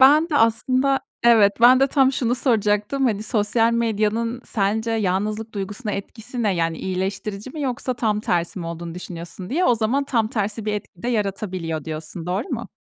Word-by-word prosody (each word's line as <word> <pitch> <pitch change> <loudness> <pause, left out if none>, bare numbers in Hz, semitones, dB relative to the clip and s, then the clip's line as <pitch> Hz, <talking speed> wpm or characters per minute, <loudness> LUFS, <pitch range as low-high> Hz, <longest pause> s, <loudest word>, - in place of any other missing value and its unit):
Ben 300 +5 +6
de 300 - 0
aslında 255 +4 +3 0.2
Evet, 220 -4 +6
ben 250 +2 +7
de 270 - +5
tam 270 -1 +3
şunu 245 -2 0
soracaktım: 220 +1 +1
Hani, 215 -5 +1
sosyal 225 +1 +2
medyanın 230 +1 0
sence 220 +2 0
yalnızlık 215 +1 -1
duygusuna 205 +2 -4
etkisi 235 +4 -5
ne? 205 -3 +2
Yani 165 -1 -1
iyileştirici 195 +4 -3
mi 310 - -7
yoksa 255 -1 -2
tam 215 -3 0
tersi 175 -1 -1
mi 170 - -5
olduğunu 170 0 -6
düşünüyorsun, 180 +1 -8
diye 340 +7 +1
o 245 - +4
zaman 230 +5 0
tam 230 -5 +1
tersi 215 -2 -2
bir 210 - -1
etki 200 -4 -6
de 240 - -2
yaratabiliyor 190 - -2
diyorsun. 160 +2 -6
Doğru 185 +6 -2
mu? - - -4
215 Hz, 180 wpm, -22 LUFS, 195-245 Hz, 0.2 s, ben